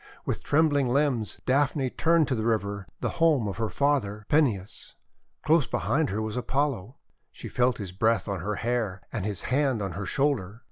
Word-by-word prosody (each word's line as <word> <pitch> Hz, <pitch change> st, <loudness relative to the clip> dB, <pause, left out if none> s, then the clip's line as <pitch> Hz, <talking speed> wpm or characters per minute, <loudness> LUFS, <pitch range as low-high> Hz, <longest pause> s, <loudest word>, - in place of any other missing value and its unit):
With -, -, -2 dB
trembling 145 Hz, -3 st, +2 dB
limbs 125 Hz, -4 st, +1 dB
Daphne 135 Hz, 0 st, +1 dB
turned 165 Hz, -2 st, +3 dB
to -, -, +1 dB
the 110 Hz, -, -1 dB
river, 100 Hz, -4 st, -1 dB
the -, -, 0 dB
home 150 Hz, -9 st, +4 dB
of 100 Hz, -, -4 dB
her 110 Hz, -1 st, -1 dB
father, 120 Hz, -8 st, 0 dB
Peneus. 120 Hz, -11 st, 0 dB, 0.5 s
Close 155 Hz, -3 st, +3 dB
be -, -, -1 dB
hind 155 Hz, +1 st, 0 dB
her 110 Hz, +3 st, -2 dB
was 110 Hz, -1 st, -4 dB
Apollo. 130 Hz, -3 st, -1 dB, 0.3 s
She -, -, -9 dB
felt 125 Hz, 0 st, +1 dB
his 100 Hz, -4 st, -6 dB
breath 110 Hz, +6 st, +1 dB
on 100 Hz, -2 st, -2 dB
her 105 Hz, +5 st, -2 dB
DAPHNE -, -, -6 dB
335 120 Hz, -, 0 dB
hair 105 Hz, -6 st, -1 dB
and 100 Hz, -4 st, -2 dB
his 105 Hz, -3 st, -3 dB
hand 135 Hz, -6 st, +1 dB
on 95 Hz, -, -3 dB
her 95 Hz, +3 st, -5 dB
shoulder. 115 Hz, -7 st, 0 dB
120 Hz, 195 wpm, -27 LUFS, 100-140 Hz, 0.5 s, home